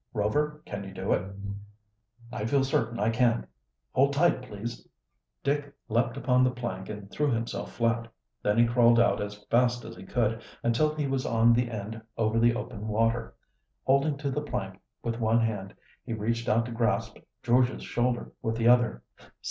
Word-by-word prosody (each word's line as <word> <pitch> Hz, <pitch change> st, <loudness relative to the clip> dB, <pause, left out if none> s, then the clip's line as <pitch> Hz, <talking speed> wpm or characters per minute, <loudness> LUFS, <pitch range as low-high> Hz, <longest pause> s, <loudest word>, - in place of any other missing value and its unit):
"Rover, 150 Hz, +8 st, 0 dB
can 100 Hz, -1 st, -5 dB
you 95 Hz, -1 st, -9 dB
do 95 Hz, +2 st, 0 dB
it?" 95 Hz, -, -2 dB, 1.0 s
"I 105 Hz, -, -3 dB
feel 135 Hz, +3 st, +3 dB
certain 120 Hz, -3 st, 0 dB
I 110 Hz, +2 st, +2 dB
can. 120 Hz, 0 st, +2 dB, 0.5 s
Hold 140 Hz, +2 st, +3 dB
tight, 155 Hz, -2 st, +3 dB
please." 115 Hz, -1 st, -7 dB, 0.6 s
Dick 145 Hz, 0 st, 0 dB, 0.2 s
leaped 120 Hz, +3 st, +1 dB
upon 125 Hz, -1 st, +3 dB
the 130 Hz, -, +4 dB
plank 115 Hz, -7 st, -5 dB
and 105 Hz, -2 st, -7 dB
threw 150 Hz, -1 st, +1 dB
himself 115 Hz, -2 st, -2 dB
flat. 115 Hz, 0 st, 0 dB, 0.3 s
Then 105 Hz, +1 st, +1 dB
he 120 Hz, -, +6 dB
crawled 120 Hz, 0 st, +5 dB
out 120 Hz, -, +3 dB
as 105 Hz, 0 st, -6 dB
fast 120 Hz, 0 st, +3 dB
as -, -, -8 dB
he -, -, -11 dB
could, 115 Hz, +2 st, 0 dB, 0.2 s
until 150 Hz, +7 st, +2 dB
he 150 Hz, -2 st, -1 dB
was 135 Hz, -1 st, -1 dB
on 115 Hz, +1 st, +5 dB
the 120 Hz, 0 st, +1 dB
end 110 Hz, 0 st, -5 dB, 0.2 s
over 110 Hz, 0 st, +2 dB
the 120 Hz, 0 st, +4 dB
open 115 Hz, -3 st, -5 dB
water. 115 Hz, +2 st, 0 dB, 0.5 s
Holding 140 Hz, +2 st, +2 dB
to 140 Hz, -1 st, -2 dB
the 150 Hz, -, -1 dB
plank 95 Hz, -9 st, -4 dB, 0.2 s
with 115 Hz, 0 st, -2 dB
one 115 Hz, 0 st, +3 dB
hand 105 Hz, -4 st, -2 dB, 0.3 s
he 115 Hz, -, -4 dB
reached 115 Hz, +2 st, -1 dB
out 115 Hz, +2 st, +3 dB
to 120 Hz, -, -6 dB
grasp 115 Hz, -1 st, 0 dB, 0.3 s
George's 125 Hz, +1 st, +2 dB
shoulder 120 Hz, 0 st, -1 dB
with 115 Hz, -1 st, -1 dB
the 115 Hz, 0 st, +1 dB
other. 120 Hz, -, +4 dB
115 Hz, 180 wpm, -28 LUFS, 110-125 Hz, 1.0 s, he